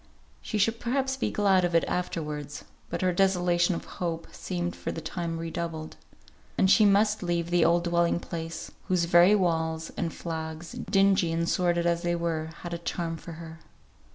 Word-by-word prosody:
She 215 - -3
should 225 +3 +2
perhaps 265 +2 0
be 265 - -1
glad 195 -3 +3
of 175 -1 0
it 165 - +4
afterwards; 150 -5 -3 0.3
but - - -3
her 180 -1 +2
desolation 175 -1 +2
of - - -6 0.2
hope 165 -2 -2
seemed 175 -1 -4
for - - -4
the - - -5
time 165 +1 -4
redoubled. 165 -1 -5 0.6
And 190 - +4
she 215 - +6
must 210 +1 +3
leave 170 -1 -1
the 175 - +4
old 170 +1 +3
dwelling 170 0 +2
place, 165 -1 -6 0.2
whose 180 -2 +2
very 175 +4 +6
walls, 160 -4 0
and 170 - -2
flags, 160 0 -6
dingy 195 -3 +2
and 165 +1 0
sordid 175 -1 +1
as 170 0 +1
they 175 -1 0
were, 165 -2 -2
had 175 -1 -5
a 170 - -3
charm 170 -1 -3
for 165 +1 -9
her. 160 0 -10
170 Hz, 180 wpm, -27 LUFS, 165-185 Hz, 0.6 s, she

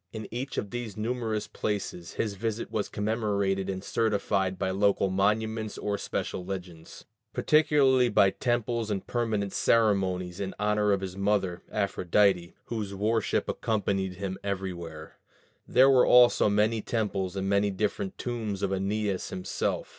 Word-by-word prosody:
In 110 -1 -6
each 130 +4 -4
of 100 - -3
these 120 -4 -5
numerous 110 -1 -2
places 100 -4 -4
his 105 -3 -2
visit 110 +2 -3
was 110 -2 -2
commemorated 105 -3 -1
and 95 0 -4
certified 100 -4 0
by 95 - -1
local 100 0 +2
monuments 110 +3 0
or 105 -1 -2
special 90 - -3
legends, 90 -3 -8 0.3
particularly 140 -5 +4
by 100 -2 +4
temples 120 -2 -1
and 100 -2 -2
permanent 110 -5 -1
ceremonies 95 -5 +1
in 95 -1 -4
honor 105 0 +2
of 100 -1 +1
his 95 -1 -5
mother 100 -3 0
Aphrodite, 95 -2 +1
whose 105 -4 -4
worship 110 +2 0
accompanied 100 -4 -1
him 95 0 -4
everywhere: 90 -5 -5 0.5
there 130 +2 +6
were 130 -2 +5
also 120 -3 +6
many 105 +2 +2
temples 100 -5 -2
and 95 0 -2
many 100 +1 +2
different 100 -1 -2
tombs 110 -5 -3
of 100 - 0
Æneas 100 0 -1
himself. 90 0 -2
100 Hz, 140 wpm, -28 LUFS, 95-110 Hz, 0.5 s, there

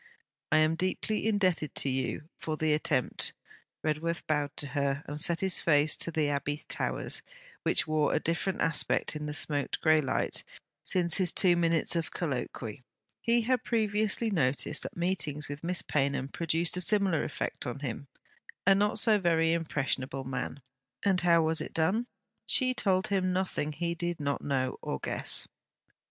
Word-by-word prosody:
'I 155 - +5
am 155 +1 +3
deeply 185 +5 -1
indebted 185 -8 +1
to - - +1
you 135 +3 -2
for 155 -1 -3
the 155 -1 +2
attempt.' 145 -4 +1 0.5
Redworth 160 +2 -1
bowed 145 -1 -1
to 145 - -1
her 140 +1 -1
and 150 +1 -5
set 170 +1 +1
his 190 -2 +2
face 150 -1 +3
to - - +2
the 155 -2 0
Abbey 145 +1 -2
towers, - - 0 0.4
which - - +3
wore 155 -1 +1
a - - +2
different 175 +3 -1
aspect 160 -1 +1
in 150 0 -4
the 150 - -4
smoked 145 -3 +1
grey 155 -1 +4
light 135 - 0 0.4
since 175 -2 +2
his 185 -3 +3
two 180 -3 +4
minutes 170 0 +2
of 165 -3 -1
colloquy. 125 -7 -4 0.4
He 235 0 +3
had 250 +1 0
previously 220 0 0
noticed 145 -3 +1
that - - -7
meetings 155 -5 -1
with 145 +2 -7
Miss 180 +1 0
Paynham 140 -2 0
produced 165 +2 0
a - - 0
similar 195 -4 +2
effect 145 - -4
on 125 +3 -5
him, 140 +1 -5 0.6
a 195 - +7
not 205 +2 +1
so 215 -2 +5
very 165 -3 +2
impressionable 135 -4 -2
man. 130 +1 -5 0.4
And 190 -3 +3
how 170 -1 +4
was 160 0 +1
it - - -7
done? 195 +9 +1 0.4
She 255 -1 +4
told 190 -6 +1
him 185 -2 +1
nothing 180 -5 -1
he 170 +2 -2
did 175 0 -3
not 140 -1 -2
know 130 -2 -1
or - - -3
guess. - - +1
160 Hz, 170 wpm, -30 LUFS, 145-185 Hz, 0.6 s, a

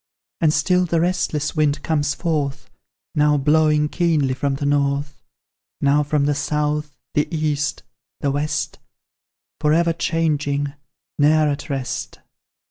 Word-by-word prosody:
And 160 -3 +3
still 180 +4 +2
the 170 -1 +1
restless 170 -4 0
wind 150 -1 +1
comes 150 -3 0
forth, 150 -5 -2 0.4
Now 150 0 +3
blowing 150 +1 +3
keenly 155 -5 +1
from 135 +1 -1
the 140 - -3
North; 140 0 0 0.6
Now 140 +1 +3
from 145 -1 +1
the 145 - +2
South, 150 +1 -2 0.2
the 150 - +1
East, 150 -2 -1 0.4
the 140 - 0
West, 145 +1 -2 0.8
For 150 0 +2
ever 170 +1 +3
changing, 145 -4 0 0.5
ne'er 155 +1 +4
at 145 +2 -4
rest. 135 -3 -4
150 Hz, 125 wpm, -21 LUFS, 145-155 Hz, 0.8 s, ne'er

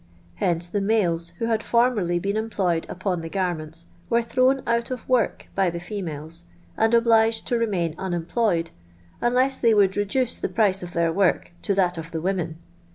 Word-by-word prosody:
Hence 170 -1 +1
the 200 +4 -2
males 180 -5 +1
who 230 - -2
had 225 -1 +1
former^ 225 -9 +2
been 200 +3 -2
employed 200 -7 -1
upon 180 -2 -2
the 165 - -6
garments 165 -3 -3 0.2
were 235 0 +2
thrown 255 +3 +2
oat 235 0 0
of 255 -2 -6
work 250 -5 +1
by 195 -2 +2
the 170 0 -5
females, 170 -3 -6 0.3
and 225 +1 +3
obliged 225 -1 +3
to 240 - +1
remain 185 -8 0
unemployed, 175 -1 -1 0.5
unless 255 +2 +2
they 230 -2 +4
would 195 -2 +4
reduce 230 +5 0
the - - -2
price 200 -4 +2
of 175 - -6
tlieir 170 -1 0
work 190 -2 +1
to 200 - 0
that 180 -3 +1
of 165 0 -7
the 165 - -4
women. 175 -2 -2
195 Hz, 175 wpm, -24 LUFS, 170-230 Hz, 0.5 s, they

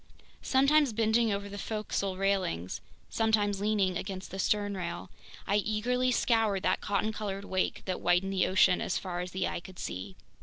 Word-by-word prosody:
Sometimes 275 0 +4
bending 225 +1 +2
over 200 0 -2
the 200 0 -7
forecastle 200 -3 -2
railings, 185 - -1 0.3
sometimes 210 -3 +1
leaning 205 -3 +1
against 190 -1 -6
the 190 - -5
sternrail, 195 - -1 0.4
I 200 - +2
eagerly 235 +5 +1
scoured 225 -5 +2
that - - +1
cotton 205 +2 0
colored 200 -2 -4
wake 185 -1 -1
that 185 -1 -2
whitened 180 +2 +2
the 185 -1 +2
ocean 185 -1 +4
as 185 - -1
far 180 -2 -4
as 180 0 -3
the 185 +1 -1
eye - - -3
could 185 +1 -13
see! 95 +1 -5
200 Hz, 165 wpm, -30 LUFS, 185-215 Hz, 0.4 s, Sometimes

